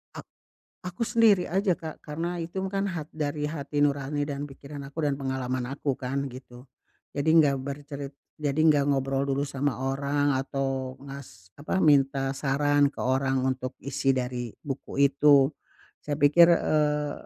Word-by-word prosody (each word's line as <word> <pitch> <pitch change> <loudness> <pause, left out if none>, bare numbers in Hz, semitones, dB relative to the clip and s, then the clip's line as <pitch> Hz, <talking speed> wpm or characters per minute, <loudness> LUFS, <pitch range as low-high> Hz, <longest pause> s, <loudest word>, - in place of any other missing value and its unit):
Ak - - -8 0.6
aku 180 +5 -5
sendiri 220 -6 +4
aja, 190 0 +2
Kak. 160 -1 -9
Karena 165 +4 -4
itu 170 +3 -6
kan 195 0 -1
hat 160 -4 -5
dari 150 -1 -2
hati 145 -1 -4
nurani 145 0 0
dan 145 0 -4
pikiran 140 +1 -10
aku 150 +4 -5
dan 140 - +1
pengalaman 130 -2 -2
aku 140 0 -2
kan, 135 +2 -2
gitu. 125 0 -12 0.5
Jadi 145 +2 +1
nggak 140 -2 +2
bercerit 140 0 -6 0.2
jadi 150 0 -1
nggak 145 -1 +3
ngobrol 135 0 0
dulu 140 +1 -1
sama 140 -2 -2
orang 140 +2 0
atau 135 -1 -3
ngas 135 -10 -11
apa, 155 +6 -2
minta 135 -2 +3
saran 145 +1 +2
ke - - -9
orang 130 +1 +1
untuk 130 0 -2
isi 135 0 0
dari 125 -2 -3
buku 140 -1 -5
itu. 140 -1 +5 0.6
Saya 145 -1 -3
pikir, 170 +4 +7
eee, 150 -3 +1
140 Hz, 155 wpm, -27 LUFS, 135-150 Hz, 0.6 s, pikir